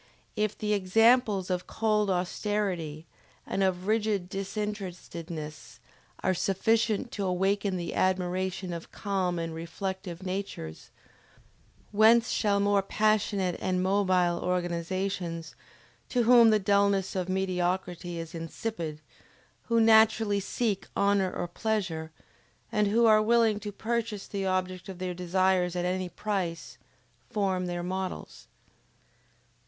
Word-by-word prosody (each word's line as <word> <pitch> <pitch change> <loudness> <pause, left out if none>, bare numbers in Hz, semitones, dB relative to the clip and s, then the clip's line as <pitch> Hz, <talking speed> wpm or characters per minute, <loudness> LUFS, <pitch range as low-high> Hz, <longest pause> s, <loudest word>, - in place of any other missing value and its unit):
] - - -38
If 215 0 -1
the 210 0 0
examples 210 0 +3
of 180 0 -2
cold 215 -2 +1
austerity 180 -4 -2 0.4
and 195 - -2
of 185 -1 +1
rigid 210 -4 0
disinterestedness 180 -6 -6 0.4
are 185 - +2
sufficient 215 +5 +1
to 205 - -3
awaken 195 +1 0
the 170 -1 -4
admiration 185 0 -1
of 170 -1 -7
calm 190 -3 -1
and 165 -1 -3
reflective 180 +2 -5
natures, 185 - -5 1.0
whence 225 +3 +5
shall 205 -2 +2
more 200 0 +3
passionate 205 -2 +1
and 185 0 0
mobile 185 -3 +2
organizations, 175 -1 -2 0.6
to 245 -2 +2
whom 235 -1 +7
the 215 - +5
dullness 200 -1 +2
of 185 -1 -2
mediocrity 180 -2 -1
is 165 0 -6
insipid, 165 -1 -5 0.7
who 230 -1 +3
naturally 220 -2 +5
seek 200 0 -2
honor 200 -2 +2
or 175 - -3
pleasure, 175 -5 -2 0.6
and 210 -2 +2
who 230 +3 +3
are 215 -1 +6
willing 225 -1 +3
to 210 0 -6
purchase 220 -1 -3
the 195 -1 -3
object 185 0 -2
of 190 - -7
their 180 0 -3
desires 180 0 +1
at 175 0 -1
any 185 0 -1
price 180 -4 -3 0.5
form 190 -3 0
their 175 0 -3
models? 185 +1 -5
190 Hz, 120 wpm, -28 LUFS, 180-210 Hz, 1.0 s, whom